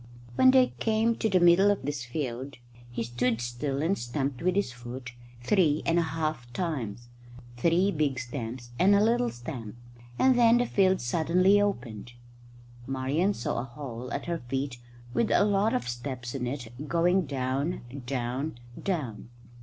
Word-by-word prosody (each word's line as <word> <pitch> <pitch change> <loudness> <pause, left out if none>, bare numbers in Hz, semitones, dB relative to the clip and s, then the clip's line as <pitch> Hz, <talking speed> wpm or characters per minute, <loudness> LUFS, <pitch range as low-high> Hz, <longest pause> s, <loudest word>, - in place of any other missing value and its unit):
When 260 - +6
they 260 -1 +5
came 225 +1 +2
to 220 - 0
the 185 -2 +4
middle 175 +3 +6
of 205 -8 0
this 145 -2 -3
field 130 0 -4 0.3
he 120 -1 -3
stood 120 0 0
still 135 +4 -2
and 180 +5 +2
stamped 135 -1 -3
with 180 +1 +1
his 200 -10 +1
foot 125 0 -8 0.3
three 155 -2 +3
and 170 +1 +3
a - - +4
half 155 -6 -3
times 120 - -3 0.5
three 175 +8 +3
big 150 -5 0
stamps 120 -1 -6
and 195 +3 +6
a - - +5
little 240 +2 +2
stamp 120 -3 -7 0.4
and 260 -1 +5
then 235 -1 +6
the 245 - +2
field 190 -4 +2
suddenly 175 +9 +3
opened. 120 - -3 0.7
Marian 140 +9 0
saw 120 - -2
a - - -2
hole 125 -2 -7
at 140 - -3
her 170 -1 -2
feet 130 +1 -3 0.3
with 230 - +1
a - - +4
lot 205 +1 +2
of 120 -1 -2
steps 120 0 -5
in 125 -3 -2
it 125 +1 -6
going 175 +1 +2
down, 135 +5 -1 0.3
down, 130 +3 -2 0.2
down. 130 - -3
140 Hz, 160 wpm, -28 LUFS, 120-185 Hz, 0.7 s, When